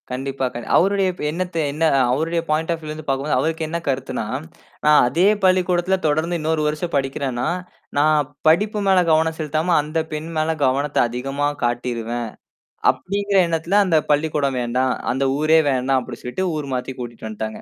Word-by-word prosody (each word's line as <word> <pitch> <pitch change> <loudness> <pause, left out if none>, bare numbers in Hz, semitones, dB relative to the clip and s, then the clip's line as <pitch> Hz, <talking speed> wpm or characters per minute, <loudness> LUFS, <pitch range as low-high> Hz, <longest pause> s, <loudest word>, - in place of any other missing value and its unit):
கண்டிப்பா, 135 +1 -3
க - - -5 0.2
அவருடைய 195 +1 +3
இப்ப 180 - -9
எண்ணத்த 180 +1 -4
என்னா 160 +3 +1 0.3
அவருடைய 165 +5 0
பாயிண்ட் 160 +2 0
ஆஃப் 165 - -5
வியூல 155 -1 -6
இருந்து 155 0 -9
பாக்கும்போது, 135 +2 0
அவருக்கு 160 0 -1
என்னா 170 +2 -3
கருத்துன்னா? 135 -4 -2 0.6
ஆ - - +7 0.2
அதே 165 +9 +2 0.2
பள்ளிக்கூடத்துல 185 0 +2
தொடர்ந்து 160 +3 0
இன்னொரு 160 0 0
வருஷம் 155 +3 -3
படிக்கிறேன்னா, 135 -2 -1 0.5
"நான் 150 -1 +3 0.2
படிப்பு 210 +7 +3
மேல 190 -1 +5
கவனம் 160 0 +2
செலுத்தாம, 155 +3 0
அந்தப் 160 +2 -3
பெண் 155 +2 -4
மேல 160 +1 +1
கவனத்த 140 +3 0
அதிகமா 135 +4 -2 0.2
காட்டிருவேன்!" 120 -1 -2 0.6
அப்படிங்கிற 200 +1 -2
எண்ணத்துல, 165 +4 0
"அந்தப் 160 -5 +1
பள்ளிக்கூடம் 145 -3 +1
வேண்டாம், 125 +2 0 0.2
அந்த 135 +2 0
ஊரே 155 +1 +5
வேண்டாம்" 130 0 +1
அப்படி - - -9
சொல்லிட்டு 125 +10 -2
ஊர் 145 -3 -4
மாத்தி 125 +1 -4
கூட்டிட்டு 120 -2 -7
வந்த்ட்டாங்க. 110 0 -5
155 Hz, 160 wpm, -21 LUFS, 130-165 Hz, 0.6 s, ஆ